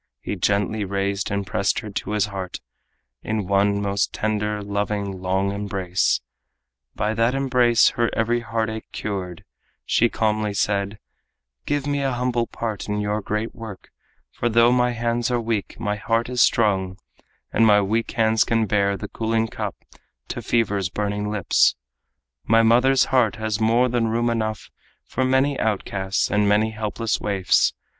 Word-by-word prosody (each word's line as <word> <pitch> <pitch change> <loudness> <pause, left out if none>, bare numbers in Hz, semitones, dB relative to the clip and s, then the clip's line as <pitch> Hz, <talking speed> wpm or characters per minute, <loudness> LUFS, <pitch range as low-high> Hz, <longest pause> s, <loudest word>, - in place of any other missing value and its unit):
He - - -4
gently 100 +1 0
raised 100 +1 -2
and 100 0 -2
pressed 100 - 0
her 105 - -8
to 100 - -4
his 105 -1 +2
heart 95 -3 -6 0.6
In 110 -2 -2
one 100 +1 +2
most 100 0 0
tender, 105 -1 -2
loving, 100 -1 -3
long 95 +1 0
embrace. 95 -7 0 0.7
By 105 +1 0
that 115 +3 +1
embrace 125 -4 +4
her 120 -1 0
every 115 +1 +1
heartache 110 -1 -3
cured, 95 -4 -5 0.4
She 120 - +3
calmly 105 -2 0
said: 100 0 0 0.7
"Give 145 -1 0
me 145 -1 -1
a 135 -2 0
humble 120 -1 0
part 110 -3 -5
In 105 0 -1
your 105 +1 -1
great 105 +2 -3
work, 110 -4 -10 0.4
for 120 - -1
though 115 +1 +5
my 125 0 +3
hands 120 0 -1
are 120 -1 +1
weak 115 -3 -3
My 105 -2 -2
heart 115 +3 0
is 125 -1 +1
strong, 95 -4 +2 0.6
and 115 - +4
my 105 -1 +6
weak 110 +3 0
hands 110 -2 +3
can 115 -1 +1
bear 100 -1 +1
The - - -6
cooling 115 0 -1
cup - - -4 0.5
to - - -4
fever's 100 -5 0
burning 105 +1 -2
lips; 105 -4 +3 0.7
My 115 +1 +4
mother's 125 +4 +4
heart 120 -4 +3
has 110 -1 -2
more 115 +3 +3
than 120 -2 0
room 120 +1 +1
enough 110 -2 -3 0.3
For 130 - -2
many 130 +2 +2
outcasts, 95 -2 -1
many 105 +1 +2
helpless 110 +1 -2
waifs." 95 -3 +2
110 Hz, 155 wpm, -23 LUFS, 100-115 Hz, 0.7 s, my